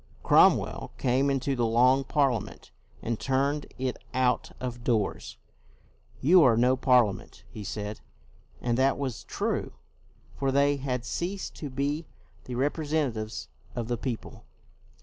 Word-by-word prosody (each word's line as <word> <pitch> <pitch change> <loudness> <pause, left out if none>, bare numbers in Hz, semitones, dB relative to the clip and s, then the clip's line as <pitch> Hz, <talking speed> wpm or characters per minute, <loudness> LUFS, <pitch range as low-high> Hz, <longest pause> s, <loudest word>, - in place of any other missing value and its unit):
Cromwell - - +4
came 130 +2 +2
into 135 0 0
the 120 -2 +1
Long 125 +4 +4
Parliament 135 -4 -1 0.3
and 115 -1 -2
turned 140 +2 0
it 130 -1 -2 0.2
out 125 -2 +1
of 120 -1 -5
doors. 110 -5 -1 0.4
" - - -31
You 175 +6 +6
are 120 -7 +5
no 125 +2 +4
Parliament," 125 -6 +2
he 105 - -7
said. 105 +1 -5 0.6
And 120 0 0
that 135 +1 +3
was 135 -4 -4
true, - - -2 0.6
for 135 -1 0
they 140 +1 +3
had 125 -3 -3
ceased 185 +10 -3
to 145 - -5
be 145 +4 -2 0.4
the 125 - -5
representatives 135 -5 -1 0.3
of 120 -2 -3
the 120 - 0
people. 120 -1 -5
130 Hz, 135 wpm, -28 LUFS, 120-140 Hz, 0.6 s, You